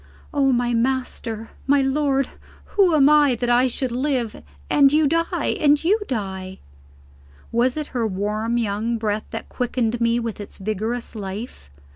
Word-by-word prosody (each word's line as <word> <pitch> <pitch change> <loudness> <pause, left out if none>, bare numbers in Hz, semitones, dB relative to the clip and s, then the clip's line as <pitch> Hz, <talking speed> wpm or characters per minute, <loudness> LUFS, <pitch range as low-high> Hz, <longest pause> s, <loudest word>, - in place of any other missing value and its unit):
"Oh, 275 -2 +3
my 240 -1 +1
master, 230 -2 -2 0.2
my 280 0 +4
lord, 275 -1 +1 0.5
who 380 -5 +4
am 280 -2 +6
I 295 -3 +5
that 245 +1 -1
I 245 +2 +4
should 255 0 -2
live 250 - -1 0.3
and 275 -1 +5
you 305 +1 +4
die! 330 +3 0
and 295 0 +4
you 405 +7 +3
die!" 190 -5 -4 0.9
Was 245 +4 +1
it 305 -1 -3
her 235 -3 0
warm 210 +4 -1
young 225 +1 -1
breath 215 -1 -2
that 225 - -6
quickened 240 -2 -1
me 230 0 +2
with 230 -3 -4
its 205 - -9
vigorous 215 +4 -3
life? 205 - -7
240 Hz, 155 wpm, -22 LUFS, 220-275 Hz, 0.9 s, am